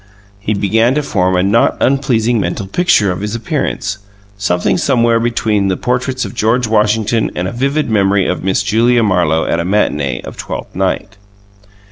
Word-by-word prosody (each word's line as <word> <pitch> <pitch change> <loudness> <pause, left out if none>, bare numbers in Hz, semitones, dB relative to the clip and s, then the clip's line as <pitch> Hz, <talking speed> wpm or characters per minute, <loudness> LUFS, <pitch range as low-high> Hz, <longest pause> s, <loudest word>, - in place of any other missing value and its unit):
He 105 +1 -2
began 110 +5 +2
to 150 - 0
form 95 -7 0
a 90 - +2
not 105 +4 +2
unpleasing 120 -4 +1
mental 95 +1 -3
picture 105 - +2
of 90 - -5
his 105 +2 -3
appearance, 115 - -3 0.4
something 90 -3 0
somewhere 115 -4 +2
between 110 -4 0
the 95 - 0
portraits 130 +1 -1
of - - -7
George 120 +2 +1
Washington 110 +1 +1
and 90 - -2
a - - -4
vivid 140 +5 -1
memory 100 -3 +2
of 90 - -2
Miss 95 +1 0
Julia 115 +4 +2
Marlowe 90 -6 +1
at 85 - 0
a - - 0
matinee 85 -8 0
of - - -9
"Twelfth - - -7
Night." - - -2
110 Hz, 170 wpm, -15 LUFS, 95-120 Hz, 0.4 s, began